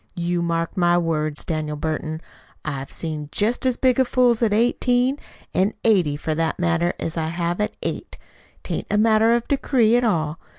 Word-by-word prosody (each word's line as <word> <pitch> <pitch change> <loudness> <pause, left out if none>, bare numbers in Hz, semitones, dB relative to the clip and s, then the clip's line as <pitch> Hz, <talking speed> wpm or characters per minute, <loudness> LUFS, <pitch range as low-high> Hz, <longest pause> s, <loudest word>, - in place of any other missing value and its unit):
You 175 0 -1
mark 165 -1 -1
my 175 -1 +3
words, 155 -3 -1
Daniel 155 -2 -2
Burton. 155 +1 -3 0.4
I 155 - -1
have 135 -1 -6
seen 155 -3 -5
jest 230 +5 0
as 255 - +1
big 260 0 +3
fools 245 -2 +3
at 225 -3 +2
eighteen, 245 +4 +2 0.3
an' 195 +3 +1
eighty, 180 -10 +3
for 155 +1 -2
that 160 +1 -1
matter, 170 0 +1
as 165 +1 -4
I 160 -1 -1
have 170 +3 -2
at 210 - -2
eight. - - -5 0.5
'T - - -5
ain't - - -4
a 210 - +1
matter 220 +1 +4
of 235 - -2
decree 250 -5 +2
at 245 - +3
all. 160 -8 0
175 Hz, 185 wpm, -22 LUFS, 160-230 Hz, 0.5 s, matter